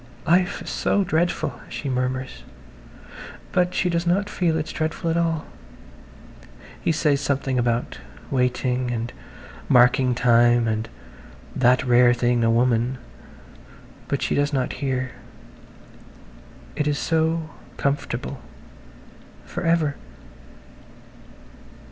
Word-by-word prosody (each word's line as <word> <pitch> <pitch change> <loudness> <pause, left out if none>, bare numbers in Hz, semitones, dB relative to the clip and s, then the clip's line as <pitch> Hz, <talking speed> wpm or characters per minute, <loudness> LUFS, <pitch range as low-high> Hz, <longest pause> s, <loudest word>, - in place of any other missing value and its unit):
"Life 180 +3 +2
is - - -7
so 200 - +1
dreadful," 175 0 -1
she 145 - -5
murmurs, 130 0 -2 1.1
but 180 0 +1
she 180 - +1
does 170 0 -1
not 200 +4 +1
feel 165 -3 +1
it's 155 - -3
dreadful 160 +2 -2
at - - 0
all. 165 -2 0 1.4
He - - +1
says 150 -3 +1
something 135 -2 0
about 120 0 -1 0.3
"waiting" 125 -1 0
and 120 0 -3 0.6
"marking 125 0 +4
time" 120 -1 +4
and 110 0 -2 0.7
"that 125 0 +3
rare 120 0 +5
thing, 120 0 +1
a 115 - +3
woman," 120 +1 +2 1.1
but - - -1
she - - 0
does 145 +1 +1
not 130 -3 -1
hear. 130 -2 -2 1.6
It 150 -1 -1
is 145 -1 +1
so 160 0 0 0.3
comfortable... 140 -2 -2 1.0
for - - -6
ever 165 -4 +1
135 Hz, 110 wpm, -23 LUFS, 125-160 Hz, 1.6 s, rare